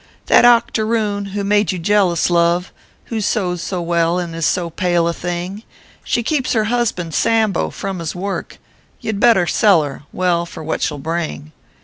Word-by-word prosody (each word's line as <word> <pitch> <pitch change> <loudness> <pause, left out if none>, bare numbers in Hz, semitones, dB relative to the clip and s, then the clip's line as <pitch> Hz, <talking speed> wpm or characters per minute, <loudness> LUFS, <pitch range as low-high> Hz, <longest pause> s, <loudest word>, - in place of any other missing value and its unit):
" - - -37
That - - +7
octoroon 220 -3 +2
who 200 +1 -4
made 205 -2 +2
you 185 - -4
jealous, 180 -1 +2
love 170 +1 +2 0.4
"Who 220 - -1
sews 180 -4 -1
so 180 -2 -3
well 170 0 +1
and 175 -2 -3
is 165 -1 0
so 175 -3 -1
pale 175 0 +1
a 170 - 0
thing; 175 +4 -4 0.4
She 240 - -1
keeps 260 0 0
her 220 -3 +2
husband, 215 -8 -1
Sambo, 225 -1 +1
from 195 -2 -5
his 165 0 -4
work 195 +2 -4 0.4
You 225 -3 -3
d 200 - -4
better 225 -6 +5
sell 185 -1 +4
her 140 -2 -6
well, 175 -2 0
for 160 - -9
what 160 - -3
she - - +1
ll 150 - -6
bring. 155 0 -4
180 Hz, 190 wpm, -18 LUFS, 170-210 Hz, 0.4 s, That